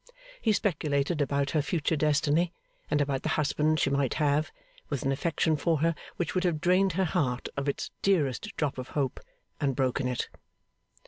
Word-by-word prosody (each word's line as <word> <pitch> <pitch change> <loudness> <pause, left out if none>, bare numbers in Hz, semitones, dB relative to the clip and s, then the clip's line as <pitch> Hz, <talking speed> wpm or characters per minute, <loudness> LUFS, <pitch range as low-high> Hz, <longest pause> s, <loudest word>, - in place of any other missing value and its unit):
He 225 - +3
speculated 150 -6 0
about 140 -1 0
her 155 - +2
future 160 +1 0
destiny, 155 +3 +2 0.4
and 150 - +2
about 140 -2 0
the - - -2
husband 155 +1 +2
she 140 - +2
might 140 -2 +1
have, 150 0 +1 0.4
with 140 -3 -2
an 135 - +1
affection 160 +2 +1
for 160 0 +1
her 165 +1 +3 0.2
which 175 - -2
would 185 - +1
have 170 -4 +1
drained 185 +2 +3
her 190 +2 +1
heart 140 -8 -1
of 140 +1 -1
its - - -3
dearest 190 - +1
drop 140 -4 -1
of 130 - -5
hope, 135 -3 0 0.4
and 135 -3 0
broken 130 0 +1
it. 125 -1 -2
150 Hz, 180 wpm, -29 LUFS, 140-165 Hz, 0.4 s, He